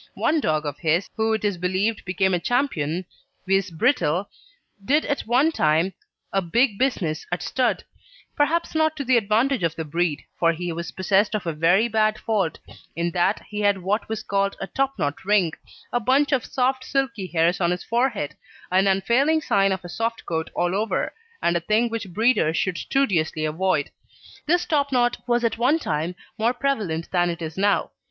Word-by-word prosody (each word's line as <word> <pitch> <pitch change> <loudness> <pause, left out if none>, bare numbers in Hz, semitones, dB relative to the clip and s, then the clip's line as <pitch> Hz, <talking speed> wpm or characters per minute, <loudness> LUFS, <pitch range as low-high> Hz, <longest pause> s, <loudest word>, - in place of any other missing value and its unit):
One 320 - +1
dog 155 - 0
of 145 -1 -4
his, 165 +3 +1
who 220 0 +1
it 220 -1 -1
is 200 -4 -1
believed 190 +5 -1
became 190 0 +1
a 175 - +2
champion, 180 - -1 0.4
viz. 195 0 +1
Brittle, 180 - +1 0.5
did 290 +8 +2
at 285 - -2
one 260 +7 +3
time 160 - +2 0.4
a 195 - +2
big 210 +4 +1
business 180 - -1
at 175 - -2
stud, 255 -1 0 0.5
perhaps 330 +4 +1
not 315 0 +2
to 280 - -2
the 255 0 +3
advantage 230 +4 +2
of 165 -1 0
the 160 - -4
breed, 165 0 -1 0.2
for 165 -1 +3
he 175 +1 -4
was 170 +1 -5
possessed 195 +3 +2
of 210 - -3
a 165 - -1
very 175 +8 +3
bad 215 -1 +1
fault, 205 -8 -1 0.4
in 170 +1 -1
that 180 +4 +1
he 210 - -4
had 205 -3 +1
what 205 +4 -1
was 220 -1 -3
called 200 0 0
a - - -3
topknot 195 - -2
ring, 190 -5 +2 0.4
a 245 - +2
bunch 270 +5 +2
of 265 -4 +1
soft 260 0 0
silky 245 -9 -1
hairs 170 +2 +1
on 170 - +3
his 180 0 -2
forehead, 235 - -1 0.4
an 190 +2 +3
unfailing 235 +11 +3
sign 195 -10 +2
of 190 -1 -3
a - - -5
soft 230 +6 -3
coat 160 -1 -2
all 175 +1 0
over, 210 +3 -1 0.3
and 170 - +2
a - - +2
thing 215 +7 +1
which 225 -3 -4
breeders 210 -6 +2
should 185 -1 -1
studiously 165 - 0
avoid. 155 -1 0 0.6
This 350 +3 +2
topknot 265 -5 +1
was 240 0 +2
at 230 -1 0
one 265 +6 +3
time 160 - -2 0.2
more 235 +3 +2
prevalent 210 -12 -2
than 175 -1 +2
it 170 0 -4
is 160 0 -5
now. 200 +1 +1
200 Hz, 185 wpm, -23 LUFS, 175-240 Hz, 0.6 s, one